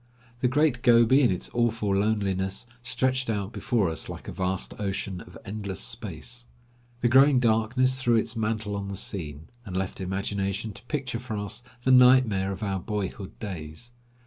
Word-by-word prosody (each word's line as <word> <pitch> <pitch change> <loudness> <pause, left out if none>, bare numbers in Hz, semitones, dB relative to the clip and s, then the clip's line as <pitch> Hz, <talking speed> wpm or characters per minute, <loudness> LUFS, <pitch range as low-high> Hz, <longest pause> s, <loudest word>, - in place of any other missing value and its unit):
The 125 - +2
Great 140 -1 +2
Gobi, 120 +3 +6
in 125 - +5
its 90 - -3
awful 115 -4 +1
loneliness, 100 -1 0 0.2
stretched 130 +2 0
out 105 -1 -2
before 115 -7 +1
us, 80 -2 -2
like - - -8
a - - -4
vast 95 0 -2
ocean 95 -2 -3
of 90 -2 -12
endless 100 -3 -4
space. 120 - -4 0.5
The 120 - +4
growing 135 +2 +6
darkness 125 +3 +2
threw 120 -2 +3
its 115 +2 0
mantle 110 -2 -1
on 100 -1 -4
the 100 -1 -4
scene, 80 -7 -4
and 95 -5 -5
left 95 0 -3
imagination 100 +2 -2
to - - -12
picture 125 -2 -3
for 120 -3 -5
us 105 +3 -4 0.2
the 130 - +3
nightmare 125 -7 +6
of 100 +3 -5
our 95 -2 -1
boyhood 100 -1 -4
days. 90 +2 -7
110 Hz, 170 wpm, -27 LUFS, 95-120 Hz, 0.5 s, Gobi